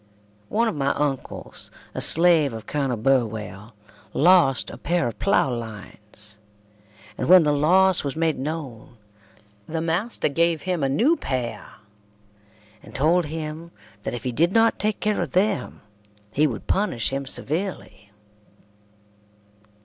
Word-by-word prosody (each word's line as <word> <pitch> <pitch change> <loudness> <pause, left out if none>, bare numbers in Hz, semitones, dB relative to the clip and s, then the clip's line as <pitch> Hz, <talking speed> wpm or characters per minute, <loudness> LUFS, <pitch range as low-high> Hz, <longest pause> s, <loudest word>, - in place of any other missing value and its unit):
One 230 +2 +1
of - - -1
my 140 -2 -1
uncles, 140 -3 -3 0.2
a - - -4
slave 165 -5 +5
of 110 -1 -8
Colonel 135 -3 -2
Burwell, 110 -3 -1 0.4
lost 165 -6 +4
a - - -9
pair 175 -5 0
of 115 - -7
ploughlines, 105 - -2 0.8
and - - -2
when 185 -1 +8
the 150 - +2
loss 180 +5 +4
was 140 -2 -4
made 160 -2 0
known 135 -6 -6 0.7
the 160 - -3
master 170 +8 -1
gave 165 +1 0
him 180 -3 -2
a 135 - +1
new 240 - +3
pair, 120 -5 -4 1.1
and - - -15
told 165 +5 +2
him 160 +1 -6 0.3
that 120 - -4
if 120 - -7
he 125 - -2
did 165 +9 +1
not 225 +1 +3
take 215 0 -1
care 210 -1 0
of - - -4
them 195 - -1 0.5
he 150 +7 +2
would 120 -6 -6
punish 185 - -1
him 135 0 -3
severely. 155 - -5
150 Hz, 135 wpm, -23 LUFS, 125-175 Hz, 1.1 s, when